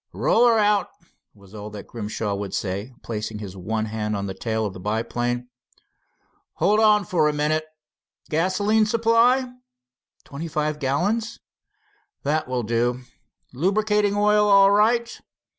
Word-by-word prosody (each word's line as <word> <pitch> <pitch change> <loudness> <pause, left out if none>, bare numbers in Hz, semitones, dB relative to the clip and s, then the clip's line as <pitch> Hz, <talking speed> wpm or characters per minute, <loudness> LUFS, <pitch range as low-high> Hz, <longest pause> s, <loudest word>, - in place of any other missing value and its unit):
"Roll 240 +2 +3
her 230 -1 +4
out," 210 -1 +2 0.5
was 100 -1 -18
all 105 0 -7
that 105 -1 -9
Grimshaw 105 -2 -4
would 100 -1 -4
say, 100 +5 -3
placing 110 -1 -4
his 100 -3 -8
one 110 +4 -3
hand 105 -1 -3
on 100 0 -3
the 95 - -4
tail 110 +1 -2
of 100 - -4
the - - -10
biplane. 120 +4 -2 1.1
"Hold 210 +2 +2
on 210 -2 +4
for 160 -4 +2
a - - -2
minute. 155 +1 0 0.6
Gasoline 205 +7 +1
supply?" 230 +3 +3 0.8
"Twenty 150 +4 -7
five 150 -1 -2
gallons." 190 - -1 0.8
"That 150 +1 0
will 125 -1 -2
do. 120 +3 0 0.5
Lubricating 205 +6 +1
oil 210 0 +3
all 195 0 +6
right. 230 +3 +2
150 Hz, 140 wpm, -23 LUFS, -, 1.1 s, all